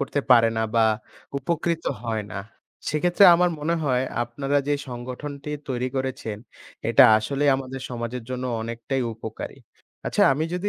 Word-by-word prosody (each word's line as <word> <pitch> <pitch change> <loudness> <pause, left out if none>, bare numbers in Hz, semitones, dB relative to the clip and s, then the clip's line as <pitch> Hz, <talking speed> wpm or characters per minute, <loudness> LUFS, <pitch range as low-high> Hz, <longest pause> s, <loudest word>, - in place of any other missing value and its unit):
করতে 140 +1 -1
পারে 115 -2 +7
না 110 - +1
বা 115 -1 +5 0.5
উপকৃত 165 +3 -1 0.2
হয় 110 -2 -2
না। - - -4 0.5
সেক্ষেত্রে 175 +6 +3
আমার 180 +1 +3
মনে 155 +3 0
হয় 130 -3 +2 0.2
আপনারা 135 +4 -2
যে 145 - +3
সংগঠনটি 130 +4 -6 0.2
তৈরি 125 -1 -1
করেছেন, 130 -5 -3 0.5
এটা - - +7
আসলেই 140 +6 +1
আমাদের 135 0 -6
সমাজের 120 0 -4
জন্য 130 0 -3 0.2
অনেকটাই 115 +3 -3
উপকারী। 110 0 -7 0.5
আচ্ছা - - +2
আমি 150 +4 -1
যদি 180 +3 -1
130 Hz, 145 wpm, -24 LUFS, 120-145 Hz, 0.5 s, পারে